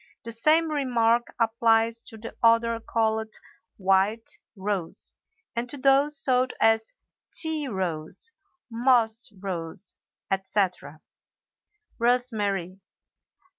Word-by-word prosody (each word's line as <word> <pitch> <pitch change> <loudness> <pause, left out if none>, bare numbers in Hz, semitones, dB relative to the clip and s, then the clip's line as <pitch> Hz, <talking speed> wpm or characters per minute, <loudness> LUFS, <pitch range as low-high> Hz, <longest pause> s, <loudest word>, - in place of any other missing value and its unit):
The 230 - -5
same 310 +7 +3
remark 240 -5 +1
applies 230 0 +2
to 225 - -11
the 225 +1 -9
odor 230 0 +3
called 220 -1 -1 0.4
"white 195 +3 0 0.2
rose" 195 -4 -3 0.4
and 235 +1 -2
to 285 - -7
those 275 +2 +4
sold 255 -1 +2
as 225 - +2 0.4
"tea 315 -3 +5
rose," 185 - -3 0.4
"moss 230 -2 +3
rose," 185 -2 -4 0.4
etc. 190 -5 -2 1.0
ROSEMARY. 210 -7 0
225 Hz, 95 wpm, -25 LUFS, 200-245 Hz, 1.0 s, tea